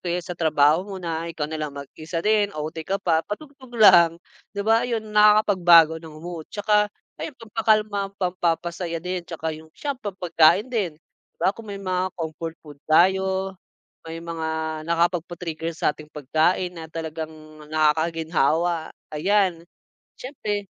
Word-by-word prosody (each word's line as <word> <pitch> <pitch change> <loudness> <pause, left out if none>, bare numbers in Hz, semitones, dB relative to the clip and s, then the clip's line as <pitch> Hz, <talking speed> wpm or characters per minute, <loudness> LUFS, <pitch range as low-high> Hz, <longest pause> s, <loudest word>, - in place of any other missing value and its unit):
kaya 175 0 0
sa 180 - -5
trabaho 155 +1 +3
mo 195 -2 -6
na, 165 0 -3
ikaw 150 -2 -3
na - - -4
lang 150 - -3
mag-isa 155 +4 -6
din, 210 -1 +3
OT 155 +2 -4
ka 195 +1 0
pa, 165 -3 +2
patugtog 270 +3 -8
lang, 170 -5 +7 0.4
'di 200 - -2
ba, 225 +1 +4
'yon 225 -3 -2
nakakapagbago 185 -6 +6
ng 160 -2 -11
mood. 170 -3 -7
'Tsaka, 210 0 +2 0.3
ayun, 300 - -5
pampakalma, 215 -3 0
pampapasaya 170 -1 -1
din, 180 0 -3
'tsaka 160 -1 -4
'yong 160 +1 -13
sa 285 -2 -2
pampagkain 185 -3 +3
din. 195 -10 -1
'Di - - -59
ba, 195 - +3
kung 225 -2 -10
may 200 - -5
mga 185 -1 -1
comfort 165 0 -5
food 145 -2 -12
tayo, 190 +2 +3 0.5
may 165 0 -6
mga 160 -1 -3
nakapagpa-trigger 170 -1 -1
sa 150 - +1
ating 155 0 -13
pagkain 160 +5 0
na 160 -1 -8
talagang 160 -1 -5 0.4
nakakaginhawa. 160 +1 +1 0.2
Ayan, 185 +1 +1 0.6
syempre 210 -6 -4
170 Hz, 145 wpm, -24 LUFS, 160-200 Hz, 0.6 s, lang